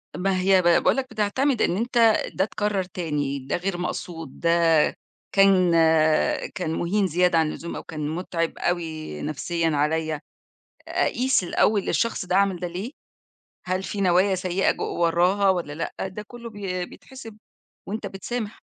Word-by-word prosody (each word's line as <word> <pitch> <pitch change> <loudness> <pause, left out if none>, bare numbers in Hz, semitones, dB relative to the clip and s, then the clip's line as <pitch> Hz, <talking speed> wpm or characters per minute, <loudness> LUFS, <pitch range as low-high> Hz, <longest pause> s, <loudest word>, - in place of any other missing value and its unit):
ما 190 0 0
هي 190 0 +4
ب - - -8
باقول 170 +9 +4
لك 260 -1 -2
بتعتمد 225 +5 0
إن 175 - +2
أنت 240 +3 -2 0.4
ده 190 - +1
اتكرر 210 -2 -1
تاني، 150 -6 -3
ده 135 +1 -3
غير 180 +1 -3
مقصود، 165 -4 -5
ده 170 - +1 0.8
كان 195 -3 +5 0.8
كان 160 - -2
مُهين 195 +4 0
زيادة 180 0 +2
عن 160 - +3
اللزوم 170 +2 -6
أو - - -6
كان 150 -2 -5
متعِب 165 0 -3
أوي 160 - -3
نفسيًا 165 +3 -1
عليّا، 155 0 0 0.7
أقيس 255 -3 +1
الأول 200 +3 +1
الشخص 230 -5 0
ده 180 +1 +1
عمل 195 -2 +2
ده 180 - -3
ليه، 185 +8 -5 0.8
هل 185 +1 -1
في 200 +1 -4
نوايا 190 +1 +3
سيئة 185 +1 +1
جو - - -5 0.2
وراها 180 +4 +3
والّا 175 -5 -2
لأ؟ 160 +3 -4
ده 190 +3 -7
كُلّه 235 0 -9
بي 190 -4 -4
بيتحسب 230 -5 -12 0.5
وأنت 215 +3 -4
بتسامح. 215 +2 -5
185 Hz, 155 wpm, -24 LUFS, 165-205 Hz, 0.8 s, كان